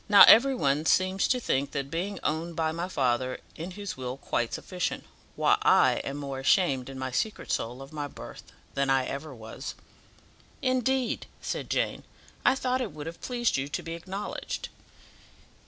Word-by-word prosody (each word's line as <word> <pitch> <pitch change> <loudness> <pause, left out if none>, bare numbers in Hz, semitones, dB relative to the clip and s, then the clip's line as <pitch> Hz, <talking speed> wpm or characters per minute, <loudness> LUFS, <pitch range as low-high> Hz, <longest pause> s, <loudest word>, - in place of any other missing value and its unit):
Now, 205 -1 +10
every 265 +4 +8
one 145 - +1
seems 185 +1 +3
to 255 - +2
think 140 - 0
that 140 0 -3
being 190 +4 -2
owned 160 +2 -1
by 160 -1 +1
my 170 +2 -3
father 130 -4 0 0.2
in 165 +3 -5
his 200 +2 -6
will 130 0 -5
quite 120 -3 -1
sufficient, 180 -1 -3 0.3
while - - +3
I - - +5
am 140 - -4
more 140 -2 -4
ashamed 135 -3 +3
in 135 - -7
my 130 0 -3
secret 215 - -2
soul 125 +4 -2
of 135 - -13
my 145 -1 -3
birth - - -11 0.2
than 140 0 0
I 135 -1 +3
ever 140 +1 -5
was." 110 -1 -7 0.8
"Indeed!" 255 -1 0
said - - -4
Jane, - - 0 0.4
"I - - +5
thought 255 -1 0
it 220 -10 -3
would 150 -1 -7
have 165 +1 -7
pleased 240 - 0
you 135 +1 -1
to 145 - -4
be 165 - -5
acknowledged." 190 +4 -5
160 Hz, 175 wpm, -28 LUFS, 135-200 Hz, 0.8 s, Now